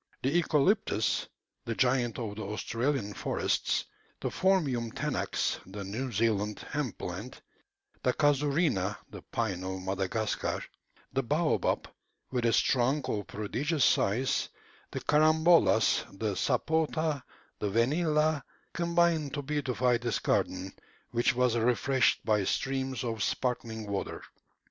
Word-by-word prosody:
The 135 Hz, -, +2 dB
eucalyptus, 160 Hz, -, +2 dB, 0.4 s
the 115 Hz, -, -2 dB
giant 125 Hz, -3 st, +2 dB
of 110 Hz, -4 st, -4 dB
the 110 Hz, -, -6 dB
Australian 110 Hz, +2 st, -2 dB
forests, -, -, 0 dB, 0.3 s
the -, -, -2 dB
Phormium 140 Hz, -12 st, +1 dB
tenax, -, -, -1 dB
the 100 Hz, +2 st, -7 dB
New 115 Hz, +7 st, -4 dB
Zealand 105 Hz, -1 st, 0 dB
hemp 145 Hz, -6 st, -2 dB
plant, 95 Hz, +8 st, -6 dB, 0.6 s
the 125 Hz, -, +2 dB
casuarina 145 Hz, -, +1 dB
(the -, -, -8 dB
pine 95 Hz, -6 st, -2 dB
of 95 Hz, 0 st, -4 dB
Madagascar), 95 Hz, +3 st, -1 dB, 0.5 s
the 135 Hz, -, +2 dB
baobab, 150 Hz, +6 st, +1 dB, 0.4 s
with 125 Hz, -2 st, +1 dB
its 115 Hz, -, +3 dB
trunk 130 Hz, +3 st, +1 dB
of 105 Hz, -2 st, -2 dB
prodigious 135 Hz, +8 st, 0 dB
size, 115 Hz, +7 st, +2 dB, 0.4 s
the -, -, -5 dB
carambolas, 155 Hz, -5 st, +4 dB
the 105 Hz, -1 st, -1 dB
sapota, 155 Hz, -, 0 dB, 0.4 s
the 105 Hz, -, -1 dB
vanilla, 150 Hz, -, +2 dB, 0.3 s
combined 170 Hz, -4 st, +1 dB
to 145 Hz, -, -3 dB
beautify 130 Hz, -4 st, +1 dB
this 120 Hz, -1 st, -1 dB
garden, 95 Hz, +1 st, -1 dB, 0.4 s
which 120 Hz, +1 st, +2 dB
was 125 Hz, -1 st, +2 dB
refreshed 125 Hz, +3 st, +2 dB
by 105 Hz, -2 st, +2 dB
streams 135 Hz, +4 st, -1 dB
of 115 Hz, -3 st, -3 dB
sparkling 115 Hz, -3 st, -2 dB
water. 100 Hz, -1 st, -4 dB
125 Hz, 120 wpm, -30 LUFS, 110-145 Hz, 0.6 s, carambolas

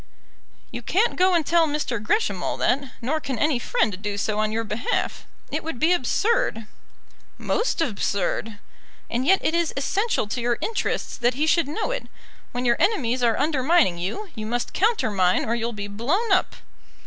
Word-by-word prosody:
"You 240 Hz, -, -5 dB
can't 405 Hz, -, +1 dB
go 370 Hz, 0 st, +4 dB
and 330 Hz, -3 st, +2 dB
tell 335 Hz, 0 st, +4 dB
Mr. 290 Hz, -7 st, -2 dB
Gresham 425 Hz, -, 0 dB
all -, -, -2 dB
that; 270 Hz, 0 st, 0 dB
nor 290 Hz, +7 st, 0 dB
can 270 Hz, -4 st, -4 dB
any 295 Hz, -2 st, +2 dB
friend 215 Hz, -5 st, 0 dB
do 205 Hz, -1 st, -3 dB
so 210 Hz, +1 st, -1 dB
on 215 Hz, 0 st, +1 dB
your 225 Hz, +1 st, -1 dB
behalf. 215 Hz, +2 st, -2 dB, 0.2 s
It -, -, -2 dB
would 325 Hz, -5 st, -5 dB
be 320 Hz, +8 st, +3 dB
absurd." 380 Hz, -, +1 dB, 0.7 s
"Most 450 Hz, -6 st, 0 dB
absurd." 210 Hz, -, -1 dB, 0.5 s
"And 250 Hz, +3 st, -1 dB
yet 385 Hz, +1 st, +5 dB
it -, -, +2 dB
is 340 Hz, -1 st, 0 dB
essential 395 Hz, -, 0 dB
to 245 Hz, -, -2 dB
your 240 Hz, 0 st, +1 dB
interests 445 Hz, -1 st, -2 dB
that 240 Hz, +1 st, +1 dB
he 300 Hz, +3 st, +1 dB
should 330 Hz, -1 st, +3 dB
know 415 Hz, +11 st, -2 dB
it. -, -, -4 dB, 0.4 s
When 245 Hz, +1 st, -3 dB
your 235 Hz, -1 st, +3 dB
enemies 265 Hz, -, +1 dB
are 235 Hz, -2 st, +2 dB
undermining 285 Hz, -, +2 dB
you, 340 Hz, -, -4 dB
you 215 Hz, -2 st, -6 dB
must 240 Hz, +1 st, -2 dB
countermine 210 Hz, -, +2 dB
or 225 Hz, -, 0 dB
you'll 235 Hz, 0 st, -1 dB
be 205 Hz, -2 st, -5 dB
blown 290 Hz, -, -1 dB
up." 375 Hz, -, +2 dB
255 Hz, 180 wpm, -24 LUFS, 225-340 Hz, 0.7 s, yet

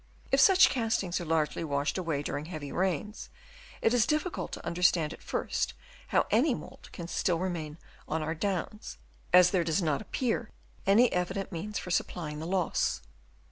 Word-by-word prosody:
If -, -, +4 dB
such 380 Hz, -2 st, +7 dB
castings 220 Hz, -8 st, 0 dB
are -, -, -5 dB
largely 160 Hz, 0 st, 0 dB
washed 145 Hz, -1 st, -1 dB
away 165 Hz, -6 st, -1 dB
during 145 Hz, 0 st, -3 dB
heavy 155 Hz, -4 st, -6 dB
rains, 190 Hz, +3 st, -2 dB, 0.5 s
it 225 Hz, -, +4 dB
is 240 Hz, -3 st, +3 dB
difficult 310 Hz, +4 st, -1 dB
to -, -, -7 dB
understand 170 Hz, -2 st, +2 dB
at -, -, -13 dB
first -, -, -2 dB, 0.3 s
how -, -, +2 dB
any 250 Hz, +4 st, +3 dB
mould -, -, -11 dB
can 170 Hz, -, -7 dB
still 175 Hz, 0 st, 0 dB
remain 165 Hz, -4 st, -3 dB, 0.3 s
on 160 Hz, 0 st, -1 dB
our 160 Hz, +1 st, -2 dB
Downs, 200 Hz, +4 st, -3 dB, 0.3 s
as 180 Hz, 0 st, +7 dB
there 185 Hz, -3 st, +2 dB
does 165 Hz, +2 st, +1 dB
not 155 Hz, -6 st, 0 dB
appear 235 Hz, 0 st, -2 dB, 0.4 s
any 225 Hz, +5 st, +5 dB
evident 190 Hz, +2 st, -2 dB
means 205 Hz, +5 st, -4 dB
for 180 Hz, -, -5 dB
supplying 155 Hz, -3 st, -2 dB
the 160 Hz, -, -5 dB
loss. 185 Hz, -1 st, 0 dB
180 Hz, 170 wpm, -30 LUFS, 160-210 Hz, 0.5 s, such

